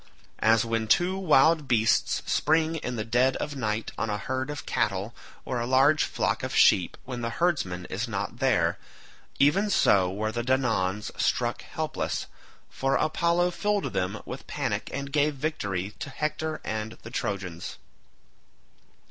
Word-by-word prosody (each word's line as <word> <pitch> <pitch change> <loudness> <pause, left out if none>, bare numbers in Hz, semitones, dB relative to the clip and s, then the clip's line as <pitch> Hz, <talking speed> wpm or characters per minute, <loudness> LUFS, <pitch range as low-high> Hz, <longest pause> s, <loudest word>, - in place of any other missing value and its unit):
As 110 +1 +4
when 115 -1 -1
two 175 - +3
wild 160 -4 +4
beasts 115 -3 +2
spring 160 +1 +2
in 125 -5 -4
the 110 -2 -3
dead 125 +3 +2
of 145 - -4
night 110 -4 -2
on 115 - -1
a 105 - -1
herd 130 +6 -3
of 150 -1 -6
cattle 100 +4 -1 0.3
or 125 - -2
a 120 - -2
large 135 +4 +4
flock - - -1
of - - -4
sheep 90 - +4
when 125 -2 -5
the 115 - -1
herdsman 115 - -1
is 110 +7 -3
not 110 +2 -4
there—even 135 - 0
so 95 - +4
were 110 +3 -2
the 120 +2 -2
Danaans 115 -6 0
struck - - 0
helpless, - - -3 0.4
for 135 +1 -1
Apollo 170 +3 +2
filled 205 +3 -1
them 95 +4 -1
with - - -8
panic - - -2
and 140 0 -5
gave 150 0 +2
victory 100 - -2
to 145 - -5
Hector 155 +2 -3
and 110 0 -3
the 115 - -9
Trojans. 95 -7 -4
125 Hz, 150 wpm, -27 LUFS, 105-150 Hz, 0.4 s, As